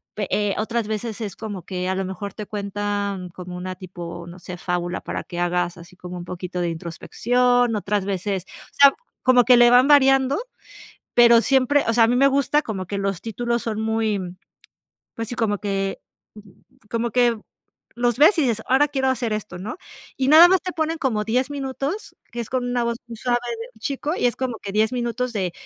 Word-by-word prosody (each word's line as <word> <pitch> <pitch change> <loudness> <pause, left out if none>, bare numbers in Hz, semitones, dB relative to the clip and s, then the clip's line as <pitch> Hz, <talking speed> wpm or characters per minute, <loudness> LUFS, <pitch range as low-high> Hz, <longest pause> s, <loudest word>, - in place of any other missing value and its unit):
pe 205 -2 -3
eh, 205 -1 +1
otras 225 0 -1
veces 220 +1 -4
es 210 -3 -4
como 205 -5 -6
que 180 0 -4
a 190 - 0
lo 195 - -1
mejor 190 +1 -6
te 210 - -7
cuentan 200 -2 -3
como 180 0 -9
una 185 +1 -5
tipo, 175 -2 -8
no 175 +1 -10
sé, 180 0 -8
fábula 175 0 -2
para - - -5
que 175 - -7
hagas 175 0 0
así 170 +1 -14
como 180 0 -8
un 175 - -7
poquito 180 0 -5
de 175 - 0
introspección, 245 +9 +1
otras 205 -1 -1
veces 195 -1 -2 0.3
o - - -27
sea, 280 -1 +7 0.3
como 250 -2 +5
que 250 - +7
le 240 0 +7
van 250 +2 +6
variando, 270 -1 +5 0.8
pero 235 -1 +7
siempre 270 +2 +3
o - - +3
sea, 230 0 +6
a - - +3
mí 245 - +2
me 275 +2 +5
gusta 280 +2 +2
como 195 -6 -5
que 200 - -4
los 195 -2 -2
títulos 235 +2 -2
son 220 -2 -3
muy, 220 -2 0 1.0
pues 230 0 -4
sí, 245 - -4
como 215 -4 0
que 195 -1 -2 0.9
como 230 0 -1
que 240 -2 +3 0.6
los 240 -1 +1
ves, 320 +6 +6
y - - +4
dices: 230 -5 0
"Ahora 270 +3 +4
quiero 265 -2 0
hacer 245 -4 -1
esto", 210 -4 -6
¿no? 210 +11 -6 0.4
Y 265 0 0
nada 320 +4 +9
más 375 -1 +3
te 365 - -4
ponen 320 0 -1
como 230 -9 0
10 250 +5 0
minutos, 280 +7 -4 0.2
que 240 - -4
es 230 - -5
con 255 -1 -1
una 245 -1 0
voz 235 0 -1
muy 235 -1 -9
suave 240 +1 0 0.2
de 230 - -5
un 220 - -22
chico, 285 +5 -2
y - - -2
es 240 - +1
como 255 -3 -3
que 195 - -6
10 220 +3 +2
minutos 245 0 -2
de, 185 -4 -1
225 Hz, 210 wpm, -22 LUFS, 195-250 Hz, 1.0 s, nada